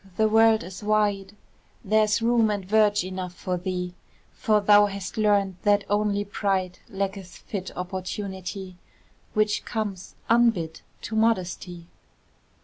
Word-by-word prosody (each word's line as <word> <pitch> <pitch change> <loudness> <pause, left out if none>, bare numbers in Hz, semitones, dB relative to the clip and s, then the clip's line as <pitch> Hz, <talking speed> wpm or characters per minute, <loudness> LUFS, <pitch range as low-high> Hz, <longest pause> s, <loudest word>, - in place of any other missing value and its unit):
the 220 - +4
world 220 -1 +4
is 185 +3 -9
wide, 205 -2 0 0.5
There's 215 +1 +2
room 230 -1 +3
and 205 -2 -2
verge 210 -1 +3
enough 185 -1 -6
for 180 0 -3
thee; 180 0 -3 0.4
For 215 -1 +2
thou 205 0 +6
hast 195 -2 -6
learned 205 -3 +2
that 205 0 +3
only 205 -1 +1
pride 190 -3 -1
Lacketh 195 -1 -4
fit 195 -6 -4
opportunity, 190 0 -5 0.6
Which 215 -1 +1
comes 205 -5 -4
unbid 225 -9 +2 0.2
to 220 - -5
modesty. 185 -5 -1
200 Hz, 125 wpm, -25 LUFS, 185-215 Hz, 0.6 s, thou